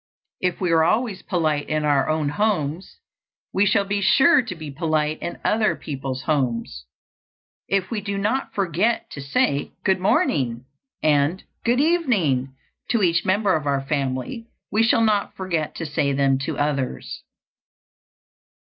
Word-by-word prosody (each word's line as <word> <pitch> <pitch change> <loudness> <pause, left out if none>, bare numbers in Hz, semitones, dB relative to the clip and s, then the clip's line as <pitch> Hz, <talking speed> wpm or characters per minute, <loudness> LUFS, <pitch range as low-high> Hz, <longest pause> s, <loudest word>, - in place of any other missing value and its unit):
If 180 -1 -1
we 180 -3 0
are 165 -1 +4
always 215 +2 0
polite 155 -5 -1
in 155 0 0
our 145 0 +2
own 155 -2 0
homes, 180 -2 -1 0.6
we 200 +2 +3
shall 200 0 +2
be 200 0 -1
sure 275 - +5
to 230 -7 -6
be 155 -3 -8
polite 155 0 -1
in 170 - -4
other 215 0 +2
people's 135 -3 -5
homes. 120 - -1 0.8
If 195 +1 0
we 220 -3 -2
do 200 0 -3
not 215 +7 -1
forget 195 +4 0
to 140 - -7
say 140 +1 0
"Good 190 -1 +2
morning" 130 -9 +1 0.4
and 150 +4 +2 0.2
"Good 240 +2 +2
evening" 200 - +1 0.3
to 230 -4 +2
each 170 -2 +2
member 195 0 +2
of 150 -2 -2
our 140 -1 +1
family, 135 - -3 0.2
we 215 +3 +2
shall 230 0 +4
not 210 -2 +1
forget 170 -5 -2
to 165 - -4
say 145 -2 0
them 135 -1 +2
to - - -3
others. 145 -3 -2
165 Hz, 150 wpm, -23 LUFS, 145-200 Hz, 0.8 s, sure